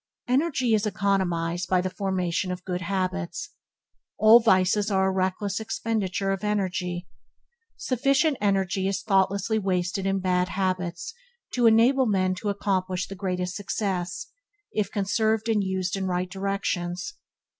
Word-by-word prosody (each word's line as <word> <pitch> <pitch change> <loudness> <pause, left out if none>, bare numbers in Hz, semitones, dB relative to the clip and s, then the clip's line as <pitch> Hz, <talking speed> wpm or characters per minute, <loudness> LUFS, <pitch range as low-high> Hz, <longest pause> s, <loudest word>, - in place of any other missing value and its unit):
Energy 260 -2 +1
is 215 0 +2
economized 180 -4 0
by 185 - +3
the 185 - -1
formation 185 -2 -1
of 180 -1 -6
good 180 -1 -3
habits. 185 - -2 0.7
All 220 +2 +8
vices 205 -1 +3
are 190 -1 +2
a 190 - +2
reckless 190 +2 -1
expenditure 210 -3 -2
of 195 +1 -3
energy. 185 -4 -2 0.7
Sufficient 275 +4 +2
energy 195 -2 +1
is 195 0 -2
thoughtlessly 195 +1 +1
wasted 190 -1 -1
in 195 0 +1
bad 180 -1 +1
habits 185 - -2 0.4
to 245 -2 +4
enable 240 +4 +5
men 185 -3 +2
to 205 +3 -3
accomplish 185 -2 -1
the 195 - -7
greatest 180 -2 -3
success, 185 -2 -3 0.5
if 210 -2 0
conserved 220 +2 0
and 215 -3 +2
used 190 -1 -1
in 190 -1 -2
right 180 0 -2
directions. 195 - -2
195 Hz, 135 wpm, -26 LUFS, 185-210 Hz, 0.7 s, All